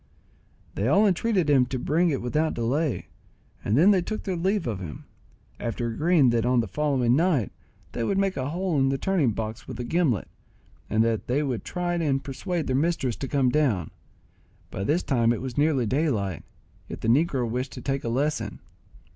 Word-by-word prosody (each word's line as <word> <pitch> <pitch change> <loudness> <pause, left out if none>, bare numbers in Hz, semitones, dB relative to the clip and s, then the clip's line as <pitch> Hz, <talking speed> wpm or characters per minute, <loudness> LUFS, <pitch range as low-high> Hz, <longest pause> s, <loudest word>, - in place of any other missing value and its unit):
They 100 - -1
all 200 +10 +4
entreated 195 -2 +1
him 135 -4 +4
to 130 - -3
bring 165 +7 +1
it 135 -6 -2
without 155 +6 0
delay, 135 +5 -1 0.5
and 105 +4 +1
then 180 +7 +6
they 190 -3 +3
took 215 +5 -4
their 190 -3 -2
leave 190 +2 0
of 110 -5 -3
him, 85 -5 -8 0.5
after 120 0 -3
agreeing 150 +1 +3
that 115 -1 +1
on 125 0 +2
the 115 - 0
following 130 -1 +1
night 155 - +1 0.4
they 115 - -3
would 195 - 0
make 195 -1 +1
a 130 +1 -2
hole 175 -1 -1
in 135 0 +3
the 135 - 0
turning 170 -4 +1
box 110 +1 -5
with 125 -2 -7
a - - -2
gimlet, 135 - 0 0.6
and 110 +1 +3
that 115 -1 -1
they 140 +5 +1
would 130 -6 -2
try 175 -1 -2
and 145 -6 0
persuade 160 +4 -3
their 130 - 0
mistress 140 -5 0
to 135 - -4
come 135 -2 +2
down. 120 - +1 0.8
By 95 - -4
this 160 - +1
time 120 -4 +2
it 120 - -1
was 130 -2 -5
nearly 145 -4 +2
daylight, 110 - 0 0.5
yet - - -7
the - - -2
negro 130 0 +2
wished 125 +4 -3
to - - -8
take 135 -1 -2
a 115 - -2
lesson. 130 -3 -1
135 Hz, 195 wpm, -26 LUFS, 120-165 Hz, 0.8 s, then